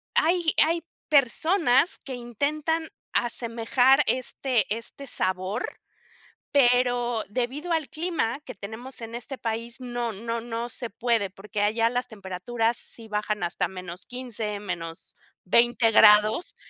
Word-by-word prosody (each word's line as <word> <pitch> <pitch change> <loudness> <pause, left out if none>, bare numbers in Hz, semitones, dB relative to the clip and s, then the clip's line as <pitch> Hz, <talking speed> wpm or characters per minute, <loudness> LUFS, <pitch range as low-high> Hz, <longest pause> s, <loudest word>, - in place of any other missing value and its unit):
hay 335 0 +3
hay 330 +2 +1 0.3
personas 295 +2 +3
que 270 - -8
intentan 295 +7 -1 0.2
asemejar 240 +3 +2
este 255 -3 +1
este 230 +5 -6
sabor, 185 0 -1 0.9
pero 245 -3 +3
debido 260 +10 -2
al 320 -3 +1
clima 320 -8 -1
que 255 - -8
tenemos 220 +7 -7
en 230 0 -7
este 245 +3 -5
país 230 +2 -4
no 240 -2 -3
no 230 +3 -4
no 235 +1 -4
se 240 0 -5
puede. 230 -2 0
Porque 205 +2 -5
allá 225 +2 +2
las 245 0 -1
temperaturas 225 +3 -2
sí 225 -1 -6
bajan 210 -2 -1
hasta 175 +1 0 0.4
-15, 230 -5 -4 0.8
-20 235 +4 +4
grados 215 +8 +6
240 Hz, 120 wpm, -26 LUFS, 220-265 Hz, 0.9 s, grados